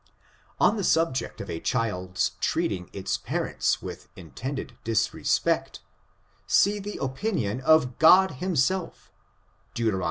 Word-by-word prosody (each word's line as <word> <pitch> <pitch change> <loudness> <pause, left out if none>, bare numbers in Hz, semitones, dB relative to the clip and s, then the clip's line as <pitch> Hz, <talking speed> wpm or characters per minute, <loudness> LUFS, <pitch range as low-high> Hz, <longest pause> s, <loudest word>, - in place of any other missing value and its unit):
On 220 - +4
the 200 - -2
subject 165 -6 0
of - - -7
a 80 - -4
child's 95 -6 -1
treating 90 -1 -1
its 95 -1 -3
parents - - -1
with - - -8
intended 120 - -6
disrespect, 115 0 0 0.7
see 205 +1 +3
the 205 +1 -6
opinion 130 - -2
of 135 -4 +3
God 185 +4 +7
himself, 180 +3 -1 0.6
Deut. 115 -2 +1
130 Hz, 115 wpm, -26 LUFS, 110-180 Hz, 0.7 s, God